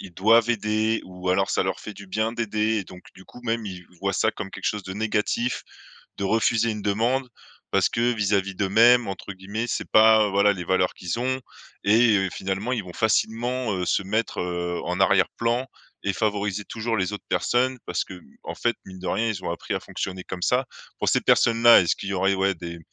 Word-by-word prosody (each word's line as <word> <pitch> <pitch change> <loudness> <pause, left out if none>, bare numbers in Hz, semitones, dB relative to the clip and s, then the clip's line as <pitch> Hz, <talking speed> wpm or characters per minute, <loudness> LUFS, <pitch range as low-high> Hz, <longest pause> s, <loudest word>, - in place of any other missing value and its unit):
ils 95 -3 -10
doivent 115 +5 +4
aider 110 0 0
ou 90 0 -7
alors 95 +1 +2
ça - - +1
leur - - -2
fait 110 - -8
du 100 -1 -12
bien 110 +4 -1
d'aider 110 -1 0
et 100 - -4
donc 90 0 -13
du 95 - -15
coup, 125 - -14
même 115 -1 -1
ils 90 -2 -8
voient 100 0 0
ça 110 +3 +1
comme 100 -2 -7
quelque - - -9
chose 105 -1 -1
de 95 0 -7
négatif, 110 +3 -1 0.6
de 100 - -2
refuser 115 +2 +2
une 105 -2 -4
demande, 120 +6 0 0.4
parce - - +3
que 120 +1 +1
vis-à-vis 100 -3 0
d'eux-mêmes, 115 +6 +4
entre 95 +1 -6
guillemets, 100 +5 -4
«c'est - - -3
pas, 110 0 +6
heu, - - -3
voilà, 100 +1 +4
les 90 -3 -6
valeurs 95 0 +1
qu'ils 90 +6 -4
ont» 130 +1 -1 0.4
et 110 +1 +5
heu, 95 -1 0
finalement 95 +6 -3
ils 115 - -2
vont 90 -1 -10
facilement, 115 +1 0
heu, 90 -1 -2
se 95 - +1
mettre, 110 +4 -2
heu, 85 -1 -3
en 90 +2 -3
arrière-plan 115 +6 +2 0.4
et 100 - +1
favoriser 105 -1 -1
toujours 115 0 -3
les 95 +1 -1
autres 105 - -6
personnes, 130 +1 +1
parce 90 - -1
que, 90 - -10 0.2
en - - -6
fait, - - 0
mine 95 -1 -10
de - - -6
rien, 115 - 0
ils 105 -4 -3
ont - - -1
appris 85 - -4
à - - -1
fonctionner 95 -1 -5
comme 90 -1 -7
ça. 125 +6 +2 0.3
Pour - - -2
ces - - +3
personnes-là, 115 0 +6
est-ce 85 - +1
qu'il 100 - -6
y - - -2
aurait, 95 +1 +2
ouais, 95 0 +1
des 85 0 -8
105 Hz, 215 wpm, -24 LUFS, 95-115 Hz, 0.6 s, pas